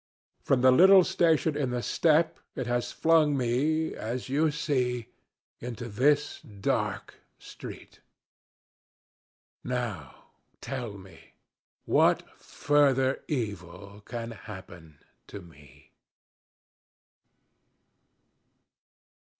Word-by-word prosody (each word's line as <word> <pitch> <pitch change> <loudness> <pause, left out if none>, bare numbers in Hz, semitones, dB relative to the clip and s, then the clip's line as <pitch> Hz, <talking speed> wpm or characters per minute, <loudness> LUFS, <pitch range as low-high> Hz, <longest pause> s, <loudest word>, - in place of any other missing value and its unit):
From 130 -2 +1
the 130 0 +6
little 190 +7 +7
station 165 -4 +1
in 140 -3 -1
the 125 -1 -3
steppe 160 0 +2 0.2
it 130 - -3
has 120 0 -2
flung 160 -3 +3
me, 145 +6 0
as 120 +3 -5
you 155 +4 +2
see, 125 -6 -2 0.5
into 120 0 -6
this 145 +7 +1
dark 100 -2 -3 0.2
street. - - -11 1.6
Now 120 - -5 0.3
tell 120 -7 -6
me 95 -3 -16 0.5
what - - +3
further 135 -2 +1
evil 100 - -5
can 115 0 -6
happen 90 -8 -11 0.3
to 100 - -8
me? 75 -5 -19
125 Hz, 85 wpm, -28 LUFS, 105-150 Hz, 1.6 s, little